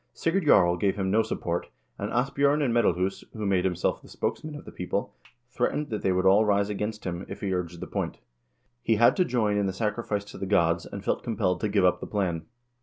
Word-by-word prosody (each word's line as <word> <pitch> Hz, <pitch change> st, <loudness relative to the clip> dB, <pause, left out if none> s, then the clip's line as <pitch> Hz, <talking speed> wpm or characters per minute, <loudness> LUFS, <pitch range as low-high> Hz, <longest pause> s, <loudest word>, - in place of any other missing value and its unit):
Sigurd 165 Hz, 0 st, 0 dB
Jarl 90 Hz, -8 st, +5 dB
gave 95 Hz, +3 st, +1 dB
him 95 Hz, -2 st, -1 dB
no 110 Hz, +3 st, +4 dB
support, 85 Hz, -5 st, -3 dB, 0.3 s
and -, -, -3 dB
Asbj0rn 140 Hz, +4 st, +2 dB
of 125 Hz, -, +1 dB
Medalhus, 95 Hz, -5 st, +1 dB
who 110 Hz, -2 st, -4 dB
made 95 Hz, -2 st, +2 dB
himself 90 Hz, -3 st, 0 dB
the -, -, -16 dB
spokesman 155 Hz, -1 st, -4 dB
of 145 Hz, -, -9 dB
the -, -, -9 dB
people, 100 Hz, +3 st, -3 dB, 0.4 s
threat 120 Hz, -, 0 dB
ened 150 Hz, 0 st, -3 dB
that 110 Hz, -2 st, -3 dB
they 95 Hz, -, +1 dB
would 90 Hz, 0 st, +1 dB
all 100 Hz, +3 st, +6 dB
rise 100 Hz, -1 st, +2 dB
against 105 Hz, +1 st, -3 dB
him, 90 Hz, 0 st, -4 dB
if 95 Hz, -, -7 dB
he 95 Hz, -2 st, -1 dB
urged 90 Hz, -1 st, -3 dB
the -, -, -3 dB
point. -, -, -3 dB, 0.6 s
He 110 Hz, -, +2 dB
had 120 Hz, +3 st, +5 dB
to 185 Hz, -, +4 dB
join 110 Hz, -6 st, +1 dB
in 100 Hz, -1 st, +1 dB
the 95 Hz, -, -2 dB
sacrifice 105 Hz, 0 st, -2 dB
to -, -, -10 dB
the 95 Hz, -, -3 dB
gods, 85 Hz, -3 st, +2 dB
and 100 Hz, 0 st, -8 dB
felt -, -, 0 dB
compelled 100 Hz, -6 st, -1 dB
to 105 Hz, -, 0 dB
give 100 Hz, -2 st, +3 dB
up 90 Hz, -, +3 dB
the -, -, -6 dB
plan. 90 Hz, -6 st, -2 dB
100 Hz, 235 wpm, -27 LUFS, 90-115 Hz, 0.6 s, all